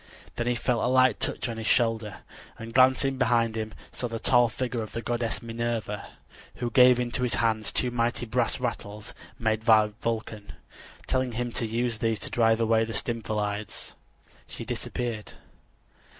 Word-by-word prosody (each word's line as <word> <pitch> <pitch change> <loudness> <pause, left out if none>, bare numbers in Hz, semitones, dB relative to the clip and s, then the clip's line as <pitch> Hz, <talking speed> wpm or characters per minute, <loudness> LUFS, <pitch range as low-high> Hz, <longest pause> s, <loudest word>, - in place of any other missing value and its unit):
Then 120 - -2
he 120 - +2
felt 120 0 0
a - - +2
light 130 -3 +4
touch - - -1
on 115 -1 -4
his 110 - -4
shoulder, 115 -4 +1 0.4
and 115 0 -8
glancing 130 +1 +4
behind 115 -3 +2
him 110 -1 -3 0.2
saw 125 - -4
the 115 -1 -4
tall 120 +1 +4
figure 120 0 -3
of 110 - -7
the 115 - -4
goddess 120 -1 -2
Minerva, 115 -3 -3 0.5
who 120 -1 -3
gave 125 0 +6
into 120 -1 -1
his 125 -2 +1
hands 110 -2 +1
two 125 - 0
mighty 120 0 0
brass 110 - 0
rattles 105 +1 -4 0.2
made 110 -1 0
by 110 -2 +5
Vulcan. 110 -3 -4 0.5
Telling 130 -2 0
him 120 +1 -2
to 115 - -1
use 115 0 -1
these 115 -1 +1
to - - -4
drive 115 -1 +3
away 115 0 +3
the 115 0 -4
Stymphalides, 105 -3 -3 0.5
she - - -7
disappeared. 115 -4 -4
115 Hz, 165 wpm, -27 LUFS, 110-120 Hz, 0.5 s, gave